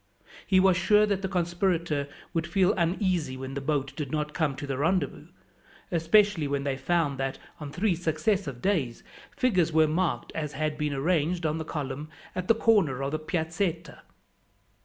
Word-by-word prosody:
He 190 - +5
was 185 -1 +4
sure 210 +3 +4
that 200 -2 -1
the 190 - -1
conspirator 175 -5 0 0.2
would 165 -1 -1
feel 190 +3 +3
uneasy 170 -6 0
when 130 +1 -6
the 140 - -3
boat 140 -1 -1
did 145 -4 -4
not 150 -1 -2
come 155 -5 0
to 145 - -6
the 140 -1 -2
rendezvous, 180 +5 0 0.6
especially 170 0 +3
when 140 0 -1
they 140 -1 -1
found 140 0 0
that, 135 0 -2 0.2
on 150 -2 -6
three 185 +5 +1
successive 160 - -1
days, 150 - 0 0.3
figures 185 - +2
were 160 0 +5
marked 170 +2 -1
as 150 -2 -3
had 155 +1 -1
been 150 -2 -2
arranged 165 +3 0
on 155 +1 0
the - - -2
column 145 0 -4 0.2
at 185 0 -4
the 230 - +5
corner 195 - +2
of 135 - -2
the 155 - -1
Piazzetta. 165 +1 -2
160 Hz, 175 wpm, -27 LUFS, 145-185 Hz, 0.6 s, He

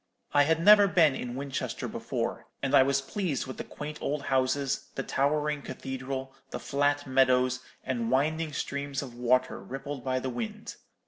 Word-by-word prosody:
I 145 0 +6
had 160 +2 +2
never 205 +3 +8
been 165 -6 +5
in 125 -2 -5
Winchester 135 0 -3
before, - - -3 0.2
and 135 0 0
I 140 - +8
was 135 +1 +2
pleased 155 -1 -2
with 130 - -7
the - - -4
quaint 150 +1 -7
old 145 0 -2
houses, 135 +1 0
the 135 - -2
towering 150 +2 0
cathedral, 130 0 -5 0.2
the - - -5
flat 145 0 +1
meadows, 130 -1 +3 0.2
and 120 -3 -2
winding 155 +5 +1
streams 140 -1 -3
of 130 -3 -9
water 125 +1 +1
rippled 135 0 -6
by 130 -1 0
the 130 0 -2
wind. 120 -2 -5
135 Hz, 170 wpm, -29 LUFS, 130-145 Hz, 0.2 s, never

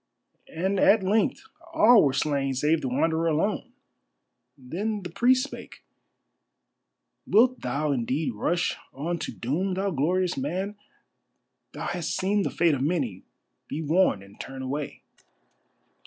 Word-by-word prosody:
And 190 +4 -1
at 205 +1 +5
length 215 +8 +1 0.3
all 235 -5 +7
were 140 - +3
slain 140 -1 0
save 150 +4 +2
the - - -2
Wanderer 160 +5 +1
alone. 200 +10 0 0.9
Then 195 +11 -4
the 175 - -7
priest 255 +6 +3
spake: 285 - -9 1.4
"Wilt 250 +4 +4
thou 145 +4 -1
indeed 135 +2 -1
rush 175 +11 0 0.2
on 165 +5 -3
to - - -4
doom, 180 +10 -2
thou 195 +1 -1
glorious 175 +4 0
man? 185 +9 -3 1.0
Thou - - -6
hast 175 -3 -2
seen 200 +2 +1
the - - 0
fate 170 -2 +2
of 135 - -1
many. 135 - -1 0.5
Be 160 - -4
warned 155 - +2
and 100 +1 -17
turn 135 0 -7
away." 140 +2 -5
165 Hz, 135 wpm, -26 LUFS, 140-195 Hz, 1.4 s, all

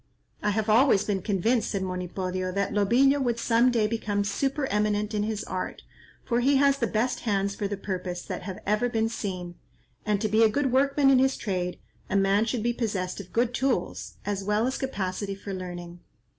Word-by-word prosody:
"I 210 - +1
have 215 +1 0
always 220 -1 +5
been 195 -3 -1
convinced," 220 +5 +1
said 195 -2 -2
Monipodio, 185 0 -3
"that 200 +1 -1
Lobillo 245 +8 +4
would 240 -3 0
some 235 +1 +3
day 230 -3 +2
become 210 -2 -1
supereminent 210 -3 0
in 210 - 0
his 210 0 -2
art, 185 - -5 0.4
for 235 -1 +1
he 275 +3 +3
has 275 0 +4
the 235 - +1
best 230 +4 0
hands 200 -3 0
for 200 - -2
the 200 0 -4
purpose 180 -2 -4
that - - -5
have 190 -2 -6
ever 215 +4 +1
been 225 -1 0
seen; 185 -6 -4 0.5
and 210 -1 +1
to 215 - 0
be 215 +2 +3
a 225 - +6
good 270 +3 0
workman 275 +1 +4
in 260 - +5
his 265 +1 +2
trade, 180 -4 -2 0.3
a - - -1
man 200 +2 +3
should 230 -1 -2
be 240 0 +1
possessed 200 -6 -2
of 185 -3 -9
good 240 +1 +1
tools, 250 -8 -1
as 200 -1 -2
well 210 +3 +1
as 260 +1 -1
capacity 200 -6 -3
for 200 0 -7
learning." 175 -2 -7
210 Hz, 200 wpm, -27 LUFS, 195-240 Hz, 0.5 s, a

